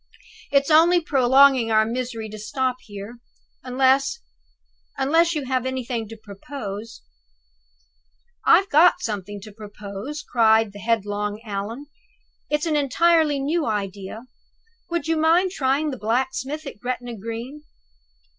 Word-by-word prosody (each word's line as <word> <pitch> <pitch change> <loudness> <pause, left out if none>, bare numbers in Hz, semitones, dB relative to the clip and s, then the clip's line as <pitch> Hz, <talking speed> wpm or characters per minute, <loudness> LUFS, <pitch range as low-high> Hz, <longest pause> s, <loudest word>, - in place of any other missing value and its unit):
"It's 280 +2 +2
only 335 +3 +6
prolonging 270 -4 +4
our 220 0 +4
misery 235 -1 -4
to 215 0 -9
stop 255 +4 -2
here, 205 +3 -9 0.4
unless 265 - +2 0.8
unless 325 +5 +2
you 295 -3 -2
have 255 -1 0
anything 255 -3 -3
to 225 +1 -10
propose?" 210 0 -8 1.4
"I've 390 - +5
got 325 +5 +6
something 205 -1 -4
to 215 +2 -11
propose," 210 +6 -8
cried 220 -3 +3
the 205 - -10
headlong 210 -1 -1
Allan. 215 +6 -5 0.6
"It's 300 +1 0
an 315 -2 0
entirely 300 +1 +3
new 305 +3 -1
idea. 200 0 -4 0.7
Would 340 -1 -2
you 325 0 +1
mind 335 +4 +3
trying 290 -1 0
the 260 - -7
blacksmith 265 +6 -2
at 275 - -8
Gretna 245 0 -4
Green?" 230 +7 -7
255 Hz, 125 wpm, -23 LUFS, 215-290 Hz, 1.4 s, only